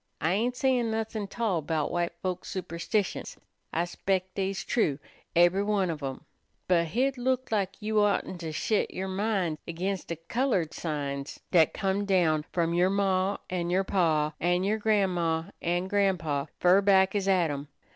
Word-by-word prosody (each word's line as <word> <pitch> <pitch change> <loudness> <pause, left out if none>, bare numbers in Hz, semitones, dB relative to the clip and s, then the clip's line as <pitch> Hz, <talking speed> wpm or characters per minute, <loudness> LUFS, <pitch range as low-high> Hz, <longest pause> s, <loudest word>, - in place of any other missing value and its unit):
I 160 - +1
ain't 235 +5 0
sayin' 250 -3 +1
nothin' 220 -2 -2
't 215 - -14
all 200 -8 +1
'bout 155 0 -1
white 175 0 -1
folks 185 -1 -3
superstitions, 185 +2 -2 0.3
I 170 +2 0
'spec' 185 +1 -2
dey's 195 0 -2
true, 155 - +1 0.4
ebery 175 +3 +5
one 200 -4 +1
ob 155 -2 -6
'em, 135 -1 -5 0.4
but 170 -2 +3
hit 255 - 0
look' 255 0 0
lak 195 -3 -1
you 215 0 +1
oughtn't 200 -3 +1
to 160 -1 -4
shet 210 +7 0
yer 190 +1 -3
min' 190 -5 -1
ag'inst 185 +3 -3
de 170 - -3
colored 180 - -1
signs 140 -3 -4
dat 165 -4 +5
done - - -8
come 195 +1 0
down 165 -6 +2
f'om 170 -1 0
yer 180 +2 +4
maw 195 0 +1
an' 175 -2 -2
yer 185 +2 +2
paw, 160 -6 +1
an' 175 +1 +1
yer 210 +3 +1
gran'maw 180 -6 +1
an' 175 +2 0
gran'paw 175 -8 0
fer 180 +2 +5
back 190 -1 +4
as 200 -2 -1
Adam. 160 -7 +1
185 Hz, 170 wpm, -28 LUFS, 170-205 Hz, 0.4 s, ebery